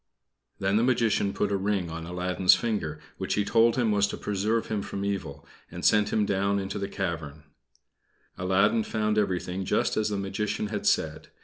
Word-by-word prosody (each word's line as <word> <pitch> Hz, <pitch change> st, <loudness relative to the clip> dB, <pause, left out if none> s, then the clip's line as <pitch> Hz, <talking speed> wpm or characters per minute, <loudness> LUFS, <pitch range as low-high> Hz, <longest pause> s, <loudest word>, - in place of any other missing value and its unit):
Then 100 Hz, +1 st, +1 dB
the 115 Hz, -, +3 dB
Magician 115 Hz, -5 st, +2 dB
put 100 Hz, 0 st, -1 dB
a -, -, +2 dB
ring 95 Hz, -3 st, -1 dB
on 80 Hz, 0 st, -6 dB
Aladdin's 90 Hz, +1 st, +3 dB
finger, 100 Hz, -10 st, -2 dB, 0.2 s
which -, -, -1 dB
he 105 Hz, -, +1 dB
told 115 Hz, +1 st, +4 dB
him 120 Hz, -4 st, +1 dB
was 100 Hz, -1 st, +3 dB
to -, -, -5 dB
preserve 105 Hz, +3 st, -1 dB
him 110 Hz, -2 st, -2 dB
from 100 Hz, 0 st, -4 dB
evil, 100 Hz, -2 st, -4 dB, 0.2 s
and -, -, -6 dB
sent 105 Hz, -1 st, +4 dB
him 105 Hz, -, +2 dB
down 100 Hz, 0 st, +1 dB
into 100 Hz, +1 st, -3 dB
the 100 Hz, 0 st, -3 dB
cavern. 80 Hz, -7 st, -4 dB, 0.9 s
Aladdin 95 Hz, +5 st, +2 dB
found 105 Hz, -1 st, 0 dB
everything 95 Hz, -1 st, -1 dB
just 95 Hz, -, 0 dB
as 110 Hz, 0 st, +1 dB
the 105 Hz, -, -2 dB
Magician 100 Hz, +2 st, -2 dB
had 105 Hz, -1 st, -3 dB
said. -, -, 0 dB
100 Hz, 185 wpm, -27 LUFS, 95-105 Hz, 0.9 s, told